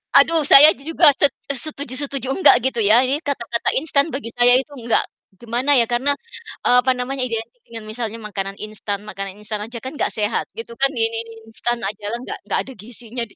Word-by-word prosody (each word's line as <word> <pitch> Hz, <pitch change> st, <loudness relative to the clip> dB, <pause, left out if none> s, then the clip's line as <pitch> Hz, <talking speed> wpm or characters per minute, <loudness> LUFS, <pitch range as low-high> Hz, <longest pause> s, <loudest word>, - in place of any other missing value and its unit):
Aduh, 330 Hz, -1 st, +5 dB
saya 300 Hz, +3 st, +9 dB
juga 315 Hz, +1 st, +4 dB
set 280 Hz, +1 st, +1 dB, 0.2 s
e -, -, -2 dB
setuju-setuju 275 Hz, -1 st, -3 dB
nggak -, -, +8 dB, 0.2 s
gitu 235 Hz, -, -5 dB
ya, 220 Hz, +4 st, +5 dB
ini 270 Hz, +3 st, 0 dB
kata-kata 240 Hz, -6 st, -2 dB
instan 285 Hz, +1 st, +2 dB
bagi 270 Hz, -6 st, -6 dB
saya 245 Hz, 0 st, +5 dB
itu 270 Hz, +3 st, -1 dB
nggak 230 Hz, 0 st, +1 dB, 0.3 s
gimana 245 Hz, +5 st, 0 dB
ya, 240 Hz, -, +6 dB
karena, 260 Hz, +5 st, +1 dB, 0.5 s
eee, 245 Hz, -, +5 dB
apa 260 Hz, +1 st, +2 dB
namanya 260 Hz, +2 st, -3 dB
identik 230 Hz, +1 st, -5 dB
dengan 225 Hz, -2 st, -9 dB
misalnya 225 Hz, 0 st, -5 dB
makanan 200 Hz, -2 st, -5 dB
instan, 210 Hz, -1 st, -4 dB
makanan 195 Hz, -2 st, -7 dB
instan 215 Hz, -1 st, -4 dB
aja 235 Hz, +3 st, -6 dB
kan 260 Hz, -, -5 dB
gak -, -, +1 dB
sehat. 210 Hz, -1 st, -2 dB
Gitu 230 Hz, +1 st, -8 dB
kan, 275 Hz, -, +4 dB
mi 225 Hz, -, +1 dB
mi 225 Hz, -, -2 dB
m -, -, -14 dB, 0.2 s
instan 240 Hz, +1 st, -2 dB
ajalah 210 Hz, +3 st, -4 dB
gak -, -, -6 dB
gak -, -, 0 dB
ada 265 Hz, -, -11 dB
gizinya 235 Hz, +2 st, -8 dB
di -, -, -18 dB
240 Hz, 200 wpm, -20 LUFS, 220-270 Hz, 0.5 s, saya